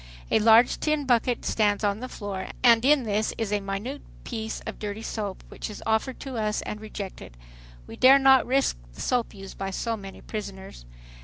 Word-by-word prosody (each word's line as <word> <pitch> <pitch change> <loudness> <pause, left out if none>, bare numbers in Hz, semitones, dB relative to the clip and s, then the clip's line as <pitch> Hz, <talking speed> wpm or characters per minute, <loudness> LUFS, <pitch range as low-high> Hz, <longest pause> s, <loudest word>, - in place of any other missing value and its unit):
A - - +5
large 225 +2 +5
tin 305 -2 0
bucket 245 -1 +1
stands 210 -1 +1
on 205 0 +1
the 255 +1 -6
floor 200 -5 -5 0.2
and 235 -2 +6
in 280 0 +4
this 215 -1 -1
is 220 -3 -2
a 205 - +2
minute 200 +8 -5 0.2
piece 220 -2 -4
of - - -7
dirty 210 +1 -5
soap, 205 -4 -4
which - - -6
is 210 - -9
offered 220 +4 0
to 265 -3 -5
us 215 -1 -1
and 210 - -6
rejected. 195 - -8 0.5
We - - -10
dare 265 +2 +8
not 270 -1 +5
risk 270 - +2 0.2
the - - -9
soap 245 -4 0
used 195 -1 -10
by 195 0 -2
so 230 +4 -2
many 195 -2 -10
prisoners. 190 - -8
220 Hz, 190 wpm, -26 LUFS, 200-245 Hz, 0.5 s, dare